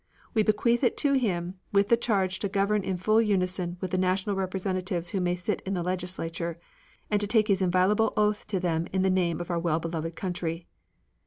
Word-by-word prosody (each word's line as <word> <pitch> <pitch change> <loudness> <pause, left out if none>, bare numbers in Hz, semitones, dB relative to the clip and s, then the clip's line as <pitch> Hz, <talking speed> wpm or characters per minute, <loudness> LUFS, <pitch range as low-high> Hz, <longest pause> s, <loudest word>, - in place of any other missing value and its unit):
We 220 - +3
bequeath 225 +3 +2
it 245 - +2
to 285 -1 +3
him 185 -8 -1
with 200 0 +3
the 235 - +7
charge 195 -5 0
to 200 - -1
govern 200 +2 +1
in 185 -1 -2
full 215 +5 +3
unison 185 -4 0
with 185 -1 -4
the 185 - +1
national 185 +2 +1
representatives 185 -2 -2
who 195 - -1
may 175 0 +1
sit 180 +4 -3
in 195 0 -3
the 175 - -1
legislature, 175 -2 -3 0.5
and 205 -1 +2
to 205 - 0
take 215 0 +3
his 195 -1 +3
inviolable 185 +4 +3
oath 210 0 +1
to 200 -3 -1
them 170 -2 -1
in 190 0 +1
the 190 - +3
name 175 -3 +1
of 175 +1 -4
our 170 - 0
well 165 -1 +1
beloved 165 0 -4
country. 170 -2 -3
185 Hz, 210 wpm, -27 LUFS, 175-205 Hz, 0.5 s, the